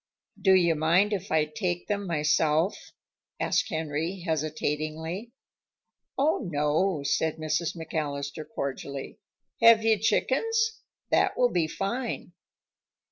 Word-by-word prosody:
"Do 190 -1 +5
you 170 -3 +4
mind 170 +7 +3
if 195 -1 -4
I 155 -1 +3
take 175 +3 -3
them 205 -2 -2
myself?" 155 +2 +1 0.5
asked - - +1
Henry, 160 +4 -3
hesitatingly. 155 +4 -3 0.9
"Oh, 290 +4 +2
no," 150 +2 +1
said 155 +2 0
Mrs. 155 +2 -1
McAllister 150 -2 -4
cordially. 140 -1 -5 0.4
"Have 230 -1 +7
you 220 -2 +3
chickens? 445 - +1 0.3
That - - +3
will 245 - +4
be 170 -3 +1
fine." 235 +9 -3
165 Hz, 110 wpm, -27 LUFS, 155-200 Hz, 0.9 s, Have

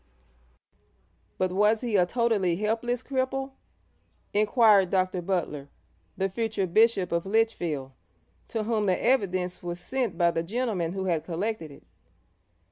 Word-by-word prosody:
'But 185 -1 0
was 210 +3 +3
he 235 -4 -1
a 180 -2 +4
totally 215 -5 +1
helpless 230 +5 -1
cripple?' 270 0 -2 0.8
inquired 210 -2 +4
Dr. 185 -1 0
Butler, 165 -6 -2 0.5
the 195 - +1
future 215 0 -2
Bishop 195 0 +3
of 170 0 0
Lichfield, 175 -11 0 0.6
to 225 -2 -3
whom 215 -2 0
the 185 - +2
evidence 185 -8 0
was 175 0 -5
sent 235 -1 -2
by 170 -1 +3
the 165 - -1
gentlemen 195 -3 -2
who 190 -1 -3
had 165 -4 0
collected 175 +1 -3
it. 140 - -15
195 Hz, 130 wpm, -27 LUFS, 175-225 Hz, 0.8 s, a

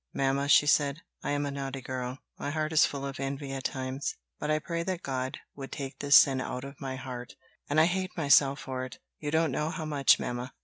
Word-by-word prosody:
"Mamma," 135 +1 +1
she 145 - +7
said, 145 +1 +2 0.2
"I - - -3
am 145 0 0
a 140 - -2
naughty 135 -1 -4
girl; 130 0 -4 0.2
my - - -3
heart 155 +1 -1
is 160 - +6
full 140 -1 -5
of 135 -1 -5
envy 135 0 -3
at 135 -1 -5
times; 130 0 -2 0.2
but 150 - -3
I 155 - +3
pray 170 +2 -3
that 185 0 -3
God 130 -1 -2 0.2
would 135 -1 -8
take 135 -1 -6
this 145 0 +5
sin 135 -2 +5
out 125 0 -4
of 140 +2 -10
my 135 -1 -3
heart; 125 -2 -7 0.3
and 145 +2 +3
I 160 - +7
hate 185 +2 -1
myself 140 -2 +5
for 130 -1 -4
it 130 -2 -8 0.2
you 150 - -3
don't 160 0 +2
know 150 +4 -1
how 165 -2 -4
much, 145 -3 +4
mamma." 125 +1 -4
140 Hz, 230 wpm, -29 LUFS, 130-150 Hz, 0.3 s, she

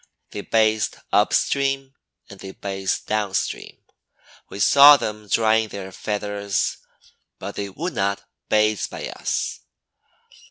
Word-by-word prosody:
They 100 - -5
bathed 110 0 +1 0.2
up - - +4
stream 135 -1 0 0.3
and 100 - -13
they 95 0 -9
bathed 95 -1 -3
down 105 -3 -1
stream. - - -4 0.7
We 100 - -8
saw 140 +7 +8
them 105 -4 -5
drying 110 +1 +2
their 95 -2 -8
feathers, 100 0 -2 0.6
but 100 +2 -7
they 100 -1 -5
would 165 - -5
not 100 0 -1 0.3
bathe 105 -1 +2
by - - -6
us. - - -3
105 Hz, 125 wpm, -22 LUFS, 100-110 Hz, 0.7 s, saw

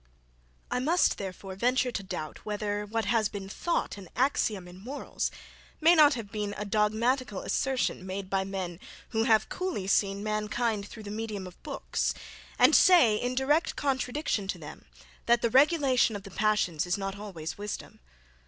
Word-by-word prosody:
I - - +1
must 325 +8 +2
therefore 190 0 -6
venture 250 +5 +1
to 215 - -3
doubt, 155 -5 -6
whether 210 0 -2
what 225 +1 -1
has 220 0 +2
been 195 -2 -6
thought 210 - -2
an 185 -4 -11
axiom 220 -7 +1
in 180 +1 -12
morals, 260 +8 -3 0.5
may 325 +2 +6
not 300 -5 +6
have 220 -4 -7
been 210 -1 -3
a 210 - -3
dogmatical 215 +2 +1
assertion 265 -8 -1
made 190 +1 -5
by 195 0 0
men 190 -3 -5 0.3
who 225 0 0
have 220 -2 +4
coolly 365 - -3
seen 195 +1 +1
mankind 215 0 -1
through 220 - -10
the 205 - -7
medium 215 -3 -4
of 180 -1 -12
books, - - -2 0.4
and - - +6
say, 335 - +7
in 245 +3 -2
direct 290 +5 +2
contradiction 265 -5 -1
to - - -2
them, - - -10 0.4
that 235 0 +4
the 235 - +2
regulation 270 -5 +4
of 200 - -6
the 195 - -11
passions 200 -6 +1
is 175 - +1
not 195 0 -3
always 195 -5 -7
wisdom. 205 0 -6
215 Hz, 170 wpm, -29 LUFS, 195-250 Hz, 0.5 s, say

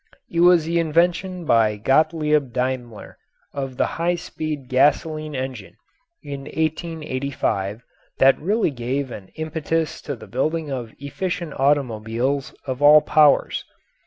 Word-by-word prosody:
It 170 - -1
was 175 -2 +6
the 170 +1 +1
invention 175 +2 +1
by 110 -5 +3
Gottlieb 150 +3 +2
Daimler 125 -3 -4 0.3
of 135 -2 -5
the - - +2
high 170 +1 -1
speed 155 -5 -5
gasoline 150 +3 +1
engine, 130 -6 -5 0.5
in 140 -1 -7
1885, 140 - -2 0.3
that 135 0 +4
really 205 +2 +1
gave 130 +1 -3
an 95 -4 -8
impetus 160 0 -2
to 145 - -5
the 110 - -12
building 150 +8 -2
of 120 -4 -4
efficient 170 +2 -4
automobiles 130 -1 0
of 130 0 -4
all 150 +1 +8
powers. 150 -2 +3
145 Hz, 125 wpm, -22 LUFS, 130-160 Hz, 0.5 s, all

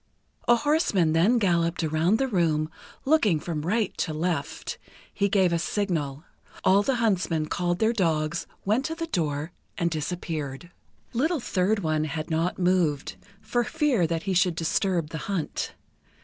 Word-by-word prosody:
A 240 - +7
horseman 235 - +2
then 190 +10 +4
galloped 170 -5 +1
around 160 +6 +2
the 270 +2 +1
room, 160 -7 +1 0.3
looking 235 - +3
from 155 -1 -3
right 210 +6 0
to 155 - -1
left. 160 -3 -3 0.3
He 200 0 +1
gave 190 -4 +3
a 170 - +1
signal. 165 -6 -2 0.4
All 195 +2 +5
the 265 +5 +1
huntsmen 190 -9 +1
called 175 +2 -1
their 220 +3 +2
dogs, 165 -5 0 0.2
went 215 +7 +2
to 325 - -2
the 330 0 -3
door, 160 - -2 0.3
and 170 -2 0
disappeared. 155 -1 -4 0.4
Little 310 +7 +1
Third 200 -2 0
One 155 -1 +1
had 155 +2 -4
not 165 +3 0
moved, 175 -6 +1 0.3
for 240 0 0
fear 275 - +1
that 165 0 -2
he 195 - -1
should 180 -1 +3
disturb 170 0 0
the 160 - -4
hunt. 185 -6 -2
175 Hz, 155 wpm, -26 LUFS, 160-210 Hz, 0.4 s, A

